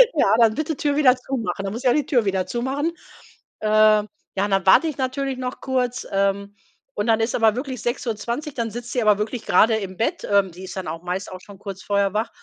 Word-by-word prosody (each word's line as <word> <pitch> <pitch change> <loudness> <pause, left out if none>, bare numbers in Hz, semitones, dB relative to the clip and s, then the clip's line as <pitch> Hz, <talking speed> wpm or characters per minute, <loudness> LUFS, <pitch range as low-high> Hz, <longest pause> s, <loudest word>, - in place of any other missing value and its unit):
„Ja, 215 -8 +4
dann 225 -2 +4
bitte 310 +3 -2
Tür 290 0 0
wieder 270 -4 +5
zumachen.” 235 -7 -4
Dann 195 0 -3
muss 235 +4 -6
ich - - +2
ja - - +4
die 295 -2 +1
Tür 245 -6 +2
wieder 190 -2 0
zumachen. 270 +7 -2 0.7
Ähm, 215 0 +4 0.3
ja, 195 +1 +1
und 205 - -4
dann 195 0 +1
warte 195 +12 +6
ich 310 - -4
natürlich 265 0 -2
noch 255 0 -5
kurz. 255 -1 -1
Ähm, 200 +1 0 0.4
und 205 +2 -2
dann 225 -1 +3
ist 225 +1 0
aber 220 -2 +3
wirklich 255 -1 -5
6:20, 240 +4 -3
dann 230 -2 -2
sitzt 240 +2 -7
sie 250 - +1
aber 210 -2 +4
wirklich 225 +3 -3
grade 220 0 +4
im 195 -3 -6
Bett. 225 - -1
Ähm, 200 -2 +3
die 180 +3 -10
ist 185 - -8
dann 190 -2 -5
auch 165 +1 -6
meist 180 +2 -4
auch 185 - -8
schon 200 +1 -14
kurz 195 -2 -7
vorher 200 -1 +1
wach. 220 +2 -1
225 Hz, 235 wpm, -22 LUFS, 200-255 Hz, 0.7 s, warte